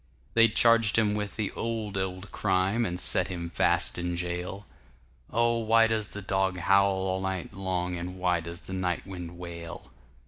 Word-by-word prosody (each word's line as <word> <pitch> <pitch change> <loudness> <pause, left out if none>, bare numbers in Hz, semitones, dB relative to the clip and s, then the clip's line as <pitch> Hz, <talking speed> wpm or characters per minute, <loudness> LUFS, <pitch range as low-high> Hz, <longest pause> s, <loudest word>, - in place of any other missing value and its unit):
They'd 115 -1 +4
charged 115 -2 +5
him 105 -2 +3
with 105 -1 -3
the 105 -3 -2
old, 110 -3 -4
old 95 +1 -4
crime, 95 +3 +1
And 90 0 -3
set - - +3
him 85 -2 -5
fast - - +2
in 85 0 -2
jail:Oh, 90 - -4
why 115 0 +4
does 110 -2 0
the 105 -1 -8
dog 95 -1 0
howl 100 +2 +4
all 95 0 -1
night 95 -2 -4
long, 90 -2 -2
And 90 +1 -6
why 90 -1 +1
does 85 +1 -8
the 95 - -9
night 90 -2 -2
wind 90 -3 -8
wail? 85 -1 -8
95 Hz, 170 wpm, -28 LUFS, 90-105 Hz, -, charged